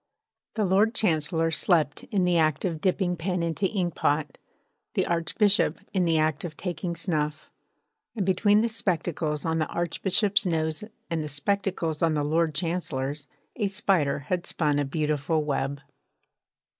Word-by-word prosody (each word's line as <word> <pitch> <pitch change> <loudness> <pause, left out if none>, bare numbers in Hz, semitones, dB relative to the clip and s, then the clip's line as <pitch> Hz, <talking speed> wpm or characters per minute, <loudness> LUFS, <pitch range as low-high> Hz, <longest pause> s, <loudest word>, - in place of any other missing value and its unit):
The 215 -2 +1
Lord 205 +5 +3
Chancellor 165 -3 +1
slept 160 -4 +2
in 195 -4 0
the 180 -1 +2
act 155 0 +1
of 165 -4 -2
dipping 185 -1 +1
pen 175 +1 -2
into 170 +4 0
inkpot; 155 -6 -1 0.6
the - - +2
Archbishop 195 +5 +2
in 185 -3 +2
the 165 -1 +2
act 155 -1 +1
of 155 -3 -6
taking 175 -1 -3
snuff; 155 -3 -2 0.6
and 205 -5 -1
between 205 +2 +4
the - - +2
spectacles 170 -8 -1
on 160 0 0
the 155 - 0
Archbishop's 190 +4 +1
nose 160 -2 -1 0.3
and 160 -2 0
the - - -4
spectacles 165 +1 -1
on 165 -2 +3
the 145 - 0
Lord 160 +1 +1
Chancellor's 150 -4 -2 0.3
a 210 -4 0
spider 185 -8 +1
had 175 +5 -2
spun 150 -3 +1
a 145 - +1
beautiful 150 +2 0
web. 140 -1 -2
165 Hz, 150 wpm, -26 LUFS, 150-185 Hz, 0.6 s, between